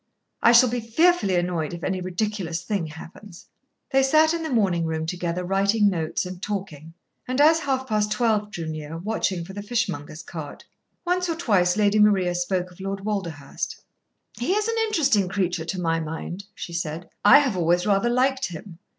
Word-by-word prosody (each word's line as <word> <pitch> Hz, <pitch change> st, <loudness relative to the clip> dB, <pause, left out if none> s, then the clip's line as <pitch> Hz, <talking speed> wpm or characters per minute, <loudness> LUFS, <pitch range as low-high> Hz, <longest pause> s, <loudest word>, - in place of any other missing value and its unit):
I 235 Hz, -, +6 dB
shall 240 Hz, +1 st, +7 dB
be 245 Hz, +1 st, -1 dB
fearfully 230 Hz, -, +2 dB
annoyed 175 Hz, -2 st, -1 dB
if 170 Hz, -, -10 dB
any 190 Hz, -1 st, -1 dB
ridiculous 185 Hz, -2 st, -3 dB
thing 195 Hz, -6 st, -2 dB
happens." 165 Hz, +4 st, -12 dB, 0.5 s
They 270 Hz, -1 st, +4 dB
sat 310 Hz, +4 st, +4 dB
in 335 Hz, -, -2 dB
the 320 Hz, -, -3 dB
morning 195 Hz, -, +1 dB
room 160 Hz, 0 st, -2 dB
together 175 Hz, +1 st, -3 dB
writing 200 Hz, +2 st, +2 dB
notes 160 Hz, -2 st, -2 dB
and 180 Hz, 0 st, -8 dB
talking, 165 Hz, -7 st, -5 dB, 0.3 s
and 255 Hz, +2 st, -2 dB
as 315 Hz, +2 st, +6 dB
half 265 Hz, -4 st, -1 dB
past 210 Hz, -3 st, 0 dB
twelve 215 Hz, -2 st, +1 dB
drew 170 Hz, -5 st, -6 dB
near, 155 Hz, 0 st, -6 dB
watching 185 Hz, -2 st, -2 dB
for 190 Hz, -, -10 dB
the 205 Hz, -, -6 dB
fishmonger's 195 Hz, -9 st, -3 dB
cart. 155 Hz, -4 st, -8 dB, 0.4 s
Once 360 Hz, 0 st, 0 dB
or 330 Hz, -, 0 dB
twice 200 Hz, -, +2 dB
Lady 210 Hz, 0 st, +3 dB
Maria 195 Hz, -4 st, +4 dB
spoke 180 Hz, +1 st, -1 dB
of 175 Hz, -, -18 dB
Lord 195 Hz, +1 st, -4 dB
Walderhurst. 170 Hz, -10 st, -4 dB, 0.6 s
"He 250 Hz, +10 st, 0 dB
is 420 Hz, +1 st, 0 dB
an 460 Hz, 0 st, -1 dB
interesting 275 Hz, -, +2 dB
creature, 180 Hz, -3 st, -1 dB
to 185 Hz, +3 st, -4 dB
my 165 Hz, -2 st, 0 dB
mind," 165 Hz, +4 st, -6 dB
she 170 Hz, -, -7 dB
said. 170 Hz, 0 st, -4 dB, 0.2 s
"I 205 Hz, -, +9 dB
have 275 Hz, -8 st, +1 dB
always 175 Hz, 0 st, +2 dB
rather 205 Hz, +3 st, +2 dB
liked 260 Hz, +2 st, +1 dB
him. 170 Hz, 0 st, -10 dB
195 Hz, 185 wpm, -24 LUFS, 170-235 Hz, 0.6 s, I